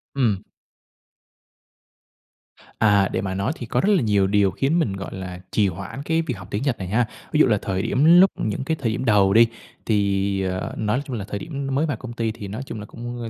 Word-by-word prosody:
Ừm. 110 -7 +1 2.4
À, 100 -3 +4
để - - -1
mà 95 -2 -3
nói 100 +8 -1
thì 120 - -7
có 120 +2 0
rất 205 - +2
là 175 - +2
nhiều 100 -3 +2
điều 100 -1 +3
khiến 150 +6 +1
mình, 105 -12 0
gọi 95 0 -6
là, 90 -1 -6
trì 105 -2 +3
hoãn 100 +10 -6
cái 165 +2 +1
việc 130 - -4
học 95 0 -10
tiếng 105 +6 -2
Nhật 135 -5 0
này 95 - -4
ha. 110 +3 +1 0.2
Ví 150 - +1
dụ - - +7
là 105 -3 +3
thời 95 -1 -2
điểm 140 +8 +1
lúc 190 0 +6
những 110 +4 -2
cái 160 +2 -1
thời 115 -5 0
điểm 125 +3 -3
đầu 100 -3 +4
đi, 115 +1 +7 0.4
thì, 100 -2 +1
à, 95 0 -2 0.2
nói 110 +5 0
chung 130 -4 -5
là 100 - -5
thời 100 - -4
điểm 140 -3 -5
nó 135 - -2
mới 145 +4 +2
vào 145 -8 -2
công 120 0 -8
ty 115 -2 -1
thì 105 -2 -8
nói 110 +6 -5
chung 110 - -6
là 105 - -7
cũng 120 0 -7
110 Hz, 240 wpm, -23 LUFS, 100-130 Hz, 2.4 s, dụ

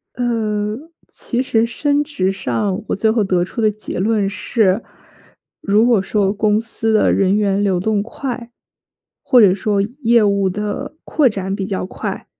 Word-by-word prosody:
呃， 215 -3 -1 0.3
其 245 0 -3
实 225 -3 +1
升 285 +5 0
职 195 -11 -1
上 190 - -2
我 - - -1
最 220 +2 +2
后 220 -1 +2
得 180 -2 +1
出 230 - -6
的 215 -1 +3
结 210 -3 -6
论 210 0 +1
是， 200 0 0 0.8
如 215 +3 +3
果 235 -5 +4
说 200 0 0
公 210 0 +1
司 225 0 -2
的 215 - +3
人 195 +1 +2
员 200 -1 +1
流 190 -3 +1
动 205 +2 0
快， 240 +1 -6 0.7
或 250 - +5
者 195 -4 +6
说 205 +1 0 0.2
业 235 -2 +4
务 200 -1 +2
的 210 +7 -4
扩 295 -4 +2
展 195 -3 -3
比 195 -2 -3
较 190 -2 -3
快， - - -6
210 Hz, 180 characters per minute, -18 LUFS, 195-230 Hz, 0.8 s, 者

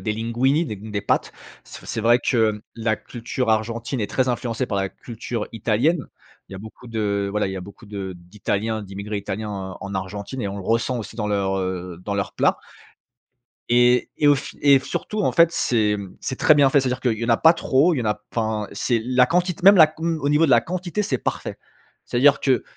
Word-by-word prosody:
des 110 - -1
linguinis, 125 +8 0
des 105 - -5
des 105 0 -5
pâtes, - - 0 0.3
c'est - - -11
v - - -15
c'est 115 - -3
vrai 120 +2 +5
que 110 -4 +1
la 110 -1 0
culture 120 +2 -5
argentine 115 +3 -1
est 105 - -1
très 130 +3 0
influencée 120 0 -2
par 100 - -2
la 95 0 0
culture 115 -1 -6
italienne. 120 +8 0 0.4
Il - - -10
y - - -6
a - - -8
beaucoup 110 +4 -12
de 100 -3 -1
voilà, 105 0 0
il 95 - -4
y 95 - -5
a 95 - -5
beaucoup 100 +4 -13
de 100 -2 -5
d'italiens, 105 +4 -3
d'immigrés 100 +2 -6
italiens 100 +2 -4
en 95 -2 -6
en 100 0 -6
Argentine 100 +7 -5
et 100 - -2
on 100 - -5
le - - -6
ressent 115 +4 0
aussi 110 0 -8
dans 105 -2 -2
leurs, 100 -2 0
heu, 90 -2 -4
dans 100 - -2
leurs 100 -1 -3
plats. - - +2 1.1
Et 120 +1 +4
et 150 - +2
au 145 - +7
f 135 - -6
et 140 -2 +6
f - - -12
surtout, 210 -1 -3
en - - +1
fait, 170 -1 +5
c'est, 110 -8 +1
mmh, 100 -2 -9
c'est 130 - -4
très 155 - +6
bien 145 -2 +5
fait. 140 0 +4
C'est-à-dire 130 0 -2
qu'il 115 -4 0
y 115 - -2
en 115 - -4
a 115 - +5
pas 165 +1 +6
trop, 150 +6 +2
il - - -2
y - - -1
en - - -5
a 105 0 -1
enfin, 110 -2 -2
c'est 115 +2 0
la 125 0 +3
quantit 180 0 +1
même 195 +2 +8
la 160 - +9
q 155 +1 -13
mmh, 165 -1 0
au 145 - 0
niveau 150 +3 +4
de 140 - +2
la 120 - +6
quantité, 180 - -3
c'est 135 -10 -1
parfait. - - -4 0.5
C'est-à-dire 140 +3 +3
que 130 -2 +2
115 Hz, 240 wpm, -22 LUFS, 105-130 Hz, 1.1 s, la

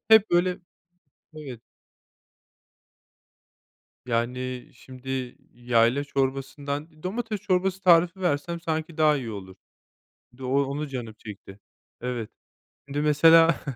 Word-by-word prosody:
Hep 220 -1 +7
böyle, 180 +2 +2 0.8
evet. 130 -7 -8 2.5
Yani, 125 +1 -2
şimdi, 130 0 -6 0.2
yayla 120 +3 +2
çorbasından, 140 +3 -3
domates 215 +2 -3
çorbası 190 0 0
tarifi 175 +1 +4
versem 170 0 -1
sanki 160 -1 -3
daha 155 -1 +5
iyi 120 -4 -5
olur. 95 -3 -8 0.8
Doğ 135 +2 +1
onu 145 +2 -3
canım 120 -5 -6
çekti. 100 -2 -11 0.4
Evet, 120 -3 -3 0.6
şimdi, 140 +1 -3
mesela, 165 +2 +6
140 Hz, 95 wpm, -26 LUFS, 125-165 Hz, 2.5 s, Hep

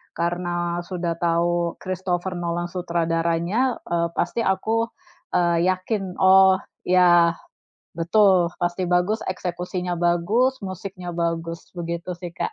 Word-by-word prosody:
karena 175 0 -2
sudah 175 -2 -3
tahu 170 0 0
Christopher 185 0 -2
Nolan 175 0 -2
sutradaranya, 170 +6 0
e 170 - -1 0.2
pasti - - -1
aku, 220 +4 +1 0.5
eee, 170 -1 +2
yakin. 185 0 -2
Oh 190 0 +6 0.3
ya, 175 -2 +5 0.6
betul, 180 0 +4
pasti 175 +1 0
bagus, 180 +5 +2
eksekusinya 180 -1 -3
bagus, 175 +10 +1
musiknya 185 -1 -6
bagus, 165 0 -3
begitu 170 +1 -4
sih 175 -2 -6
Kak. - - -3
175 Hz, 110 wpm, -23 LUFS, 170-185 Hz, 0.6 s, Oh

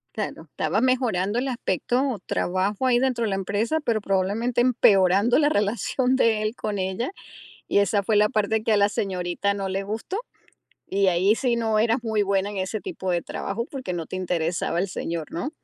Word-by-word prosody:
Claro, - - -4
estaba 215 - -1
mejorando 235 -6 +1
el 270 - -2
aspecto 245 0 -1
o 225 - -3
trabajo 190 +7 -1
ahí 245 - +4
dentro 255 -3 0
de 215 - -1
la 195 - 0
empresa, 205 +10 -1
pero 230 -6 0
probablemente 205 +6 0
empeorando 205 -3 +4
la 295 -1 +4
relación 240 +4 +1
de 225 -4 +3
él 215 +2 -2
con 210 -4 -3
ella, 190 - -2 0.6
y - - +2
esa 200 0 +2
fue 210 +2 +1
la 210 0 +5
parte 215 +1 0
que 225 - +1
a 210 - +4
la 200 0 +4
señorita 190 -1 -1
no 195 -1 -3
le 195 +1 -2
gustó, 220 - -4 0.7
y 195 0 +2
ahí 185 +4 +3
sí 240 -1 0
no 220 -2 +1
eras 230 +3 +3
muy 220 -3 +1
buena 200 0 0
en 205 - -7
ese 190 +3 -2
tipo 190 -1 -4
de 175 -1 +1
trabajo 230 +4 -4
porque 260 -10 -5
no 170 -2 -4
te - - -6
interesaba 170 -2 -1
el 190 +3 0
señor, 165 -3 -4
¿no? 215 - -3
205 Hz, 200 wpm, -24 LUFS, 190-235 Hz, 0.7 s, la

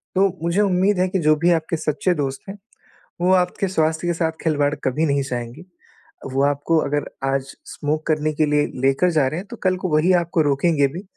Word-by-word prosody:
तो 195 +1 +4 0.2
मुझे 170 +4 +1
उम्मीद 190 0 +2
है 185 - +2
कि 190 - -1
जो 155 -2 +4
भी 175 - +5
आपके 165 0 0
सच्चे 155 +4 0
दोस्त 135 -3 -3
हैं, 195 - -7 0.6
वो 180 +1 +3
आपके 180 +1 +1
स्वास्थ्य 160 -2 0
के 175 - +1
साथ 165 -1 -1
खिलवाड़ 145 -3 +1
कभी 140 +5 0
नहीं 140 -2 +1
चाहेंगी। 120 +4 -6 0.7
वो 135 +1 +1
आपको 145 +3 +1
अगर 145 +1 -1 0.2
आज 135 0 -2
स्मोक 155 +1 -3
करने 155 -1 0
के 155 +1 +1
लिए 150 0 +1
लेकर 135 +7 +2
जा 150 -5 +2
रहे 155 +6 -3
हैं, 195 - -9
तो 235 - -8
कल 185 -1 +2
को 185 0 -3
वही 160 +4 +3
आपको 170 0 0
रोकेंगे 145 0 +2
भी, 170 +8 -8
155 Hz, 210 wpm, -21 LUFS, 145-180 Hz, 0.7 s, भी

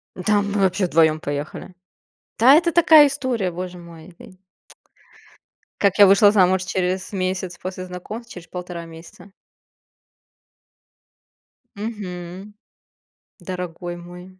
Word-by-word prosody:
Да 205 +2 +1
мы 200 0 -2
вообще 190 0 +1
вдвоём 160 -1 +3
поехали. 145 +5 -6 0.7
Да 260 +5 +7
это 340 +1 +3
такая 315 -3 +7
история, 255 -9 -2
боже 180 +1 -7
мой. 170 0 -14 1.6
Как 200 -1 +2
я 200 - +10
вышла 200 +1 +6
замуж 190 -2 +3
через 185 +1 -2
месяц 185 -1 -3
после 185 0 -7
знакомства, 215 +6 -9
через 180 -1 -11
полтора 180 -2 -7
месяца? 165 +4 -14 2.4
Мгм. 195 -2 -7 0.9
Дорогой 175 -1 -6
мой 180 +2 -13
185 Hz, 105 wpm, -21 LUFS, 175-205 Hz, 2.4 s, я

